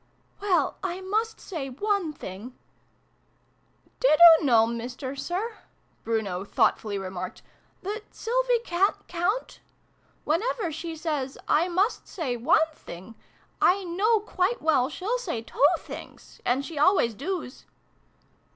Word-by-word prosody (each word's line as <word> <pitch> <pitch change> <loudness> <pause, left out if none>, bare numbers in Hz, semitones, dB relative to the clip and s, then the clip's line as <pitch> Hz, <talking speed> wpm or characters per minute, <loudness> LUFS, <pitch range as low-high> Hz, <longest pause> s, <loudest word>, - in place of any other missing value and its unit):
" - - -35
Well, 360 -8 +1
I 370 -1 -2
must 430 +4 -1
say 305 -8 -5
one 395 +4 -1
thing 220 -2 -9 0.5
" - - -40
" - - -37
Did 305 -12 +4
oo 335 -2 +10
know, 230 -4 +5
Mister 245 +4 -5
Sir," 375 - -3 0.4
Bruno 205 -5 -1
thought 200 - +2
fully 205 -2 -4
remarked, 185 -1 -6 0.2
" - - -38
that 420 +3 -4
Sylvie - - +1
ca'n't 370 +4 0
count? 355 +8 -2 0.6
Whenever 365 +2 0
she 325 +1 -5
says 300 -5 -3
' - - -37
I 345 - +1
must 380 +6 0
say 295 -10 -3
one 310 +7 +3
thing,' 190 - -11 0.5
I 385 +2 +4
know 400 +6 +2
quite 410 +3 0
well 285 -5 +2
she'll 425 +10 -2
say 235 - -4
two 435 - -3
things! - - -11
And 260 +3 +1
she 315 -2 -6
always 300 - +4
doos." 305 - -5
330 Hz, 140 wpm, -26 LUFS, 250-395 Hz, 0.6 s, oo